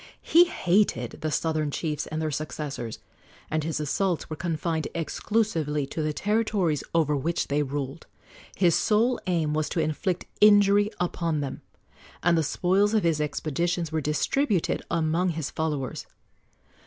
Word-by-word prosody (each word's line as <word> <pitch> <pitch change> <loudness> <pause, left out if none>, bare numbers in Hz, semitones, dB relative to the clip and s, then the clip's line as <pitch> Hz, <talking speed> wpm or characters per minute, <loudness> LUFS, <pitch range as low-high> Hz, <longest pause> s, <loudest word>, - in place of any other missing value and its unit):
He 345 +2 +6
hated 180 - +1
the 155 - -1
southern 155 -1 0
chiefs 150 +1 -3
and 155 - -4
their 155 -1 -1
successors, 145 -5 -4 0.5
and 155 -1 0
his 155 -1 -2
assaults 165 +3 -1
were - - -2
confined 160 -1 -2
exclusively 165 -4 -1
to 155 - -4
the 155 0 0
territories 200 -5 0
over 150 -3 +3
which 160 +5 -1
they 145 +1 +1
ruled. 140 +1 -4 0.5
His 175 -3 +3
sole 230 +7 +2
aim 165 -4 +1
was 155 0 0
to - - -2
inflict 160 +4 -1 0.2
injury 205 0 +6
upon 170 -3 -1
them, 135 -2 -5 0.6
and 175 0 +4
the 165 - +3
spoils 190 +7 +2
of 215 - +2
his 165 -3 +2
expeditions 165 +3 -1
were 160 0 0
distributed 180 - 0
among 165 +3 +1
his 160 -3 -3
followers. 150 -4 -3
160 Hz, 145 wpm, -26 LUFS, 150-185 Hz, 0.6 s, He